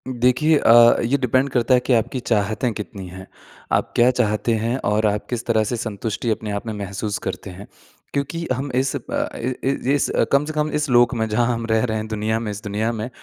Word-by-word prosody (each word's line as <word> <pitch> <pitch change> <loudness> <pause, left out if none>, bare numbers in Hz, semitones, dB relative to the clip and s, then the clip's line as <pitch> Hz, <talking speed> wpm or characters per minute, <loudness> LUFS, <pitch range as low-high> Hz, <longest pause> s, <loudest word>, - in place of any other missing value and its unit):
देखिए 130 +6 +3
अ, 120 -2 +6
ये 125 +5 +2
डिपेंड 130 +1 +1
करता 125 -1 +1
है 125 - +6
कि 130 - +2
आपकी 120 +3 0
चाहतें 110 +1 0
कितनी 100 -3 -7
हैं। 95 +2 -10 0.5
आप - - +1
क्या 120 +1 +5
चाहते 115 -2 0
हैं 115 +3 -1
और 105 +1 +1
आप 105 0 -1
किस 120 -2 -3
तरह 110 -2 +2
से 115 +3 -2
संतुष्टि 110 +1 -3
अपने 110 -1 -3
आप 100 +3 -4
में 110 - -3
महसूस 100 0 -4
करते - - -5
हैं, 95 +2 -10 0.5
क्योंकि 145 +4 -2
हम 135 +2 -4
इस 130 +1 0
अ, - - -2 0.4
इ 125 +2 -2
इ - - -1 0.3
इस 145 - 0 0.2
कम 140 +1 +3
से 155 - -5
कम 150 0 -1
इस 150 -1 -2
लोक 120 0 +4
में 110 -1 0
जहाँ 115 +2 +1
हम 115 0 -3
रह 110 0 +3
रहे 110 -3 -1
हैं 110 0 -4
दुनिया 110 +1 -1
में 110 -2 -4
इस 105 +1 -8
दुनिया 105 +2 -1
में, 115 +1 -4
115 Hz, 225 wpm, -21 LUFS, 105-125 Hz, 0.5 s, अ